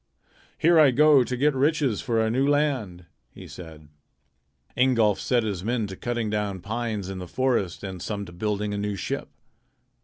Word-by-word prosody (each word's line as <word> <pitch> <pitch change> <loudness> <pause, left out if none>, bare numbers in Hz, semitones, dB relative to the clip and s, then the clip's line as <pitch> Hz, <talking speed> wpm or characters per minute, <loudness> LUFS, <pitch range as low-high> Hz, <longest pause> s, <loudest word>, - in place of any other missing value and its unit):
"Here 165 0 +4
I 150 -3 +7
go 145 +1 +5
to 125 +1 -4
get 145 +3 +2
riches 140 -4 +1
for 115 -2 0
our 110 0 +1
new 135 +4 +1
land," 130 - 0 0.2
he - - -12
said. 80 -3 -11 0.9
Ingolf 115 -5 +3
set 120 -2 +1
his 100 -5 -3
men 115 0 -1
to 95 -1 -7
cutting 120 0 -3
down 105 -3 -2
pines 110 -1 -3
in 95 -1 -6
the 90 - -7
forest 115 -7 -1
and 95 -3 -6
some 100 +1 -4
to 85 - -11
building 105 +3 -2
a 100 - -3
new 105 0 -2
ship. 95 - -4
110 Hz, 180 wpm, -25 LUFS, 100-130 Hz, 0.9 s, I